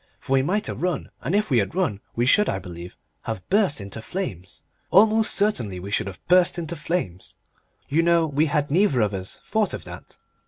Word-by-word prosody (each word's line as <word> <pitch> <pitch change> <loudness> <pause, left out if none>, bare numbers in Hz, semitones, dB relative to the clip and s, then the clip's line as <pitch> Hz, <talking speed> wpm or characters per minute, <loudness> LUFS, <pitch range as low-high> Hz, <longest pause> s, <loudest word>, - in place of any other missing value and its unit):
For 135 - -3
we 135 - +5
might 200 +10 0
have - - -5
run, 180 -4 -2
and 160 +10 -1
if 210 -6 +1
we 125 - +5
had 105 - -2
run 140 - 0
we 120 - +1
should, 210 +11 +4
I - - 0
believe, 90 -1 -9 0.3
have 110 -5 -5
burst 195 - +2
into 100 +2 -7
flames. 100 - -6 0.3
Almost 220 +2 +5
certainly 120 - 0
we 100 +3 -7
should 105 - 0
have 95 - -8
burst 180 -1 +4
into 170 0 -4
flames! 150 - -3 0.5
You 155 +4 +2
know 170 -1 +3
we 150 +1 +1
had 145 -1 0
neither 160 - +3
of 105 -1 +1
us 95 0 -6
thought - - 0
of - - -8
that.... - - -11
145 Hz, 205 wpm, -24 LUFS, -, 0.5 s, we